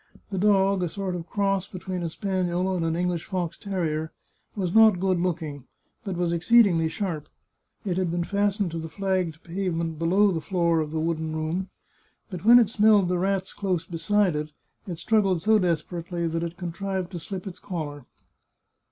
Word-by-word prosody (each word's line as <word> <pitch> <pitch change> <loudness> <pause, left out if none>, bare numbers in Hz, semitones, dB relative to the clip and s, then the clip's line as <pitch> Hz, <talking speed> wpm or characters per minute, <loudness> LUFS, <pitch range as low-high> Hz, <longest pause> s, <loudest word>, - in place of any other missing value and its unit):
The 190 - -2
dog, 195 -1 +3
a 175 - 0
sort 195 +1 -3
of 170 -1 -7
cross 195 -1 0
between 185 -1 -5
a 170 - -2
spaniel 185 0 -1
and 170 - -1
an 165 0 0
English 175 -1 -1
fox 180 -3 -3
terrier, 160 -5 -2 0.4
was 185 -4 -2
not 220 -4 +6
good 185 -1 +1
looking, 160 -6 -3 0.4
but 195 -5 -4
was 175 -1 0
exceedingly 175 -2 +4
sharp. 165 -4 -4 0.6
It 185 -3 -1
had 185 -2 0
been 175 +1 -1
fastened 200 -1 0
to 165 - -4
the 160 0 -6
flagged 185 -4 -2
pavement 170 -3 -2
below 190 +5 +3
the 165 -3 -2
floor 170 0 +1
of 155 -1 -1
the 160 +1 -2
wooden 160 -1 -2
room, 165 +4 -2 0.6
but 180 -1 -6
when 235 +3 +8
it 225 -4 +4
smelled 210 -4 +4
the 180 -1 +1
rats 190 0 -1
close 185 -5 -1
beside 180 +1 +1
it, 150 0 -3 0.4
it 175 -3 -4
struggled 195 -4 +1
so 215 +1 +5
desperately 170 0 -2
that 165 0 -2
it 170 +1 -4
contrived 185 +1 -4
to 175 - -5
slip 185 +2 -6
its 190 -3 -8
collar. 145 -7 -6
180 Hz, 180 wpm, -26 LUFS, 165-195 Hz, 0.6 s, when